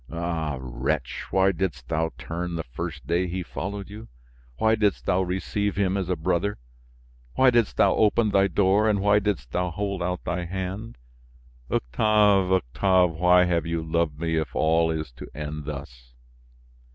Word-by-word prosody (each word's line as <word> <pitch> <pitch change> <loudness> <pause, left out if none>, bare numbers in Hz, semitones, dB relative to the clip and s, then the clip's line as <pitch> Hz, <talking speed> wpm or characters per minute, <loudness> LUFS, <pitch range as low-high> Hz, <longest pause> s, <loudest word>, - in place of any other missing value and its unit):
Ah! 80 -3 -3
wretch! 65 +2 -3
why 95 0 +3
didst 85 -9 -3
thou 80 0 0
turn 85 +1 -4
the 80 - -3
first - - -6
day 90 +2 0
he 90 +1 -3
followed 100 +3 -5
you? 105 +2 -10 0.5
Why 110 +7 +3
didst 105 -3 +1
thou 90 - +2
receive 95 +2 -2
him 95 -1 +1
as 95 -3 -2
a 90 - +1
brother? 90 +5 -1 0.8
Why 130 -1 +5
didst 120 -3 +1
thou - - +5
open 110 0 +3
thy 100 0 +4
door, 100 +2 +3
and 105 -2 +2
why 105 +1 +4
didst 95 - -2
thou 90 0 0
hold 100 +1 -3
out 90 +1 -2
thy 90 0 -2
hand? 95 - -5 0.7
Octave, 100 - +3
Octave, 90 +3 +2
why 90 +2 +4
have 85 -2 0
you 85 -1 -2
loved 80 -2 -1
me 80 -1 -1
if 80 - -3
all 80 +1 +3
is 80 -3 -3
to - - -10
end 75 0 -5
thus!" 65 -4 -9
90 Hz, 165 wpm, -25 LUFS, 80-100 Hz, 0.8 s, Why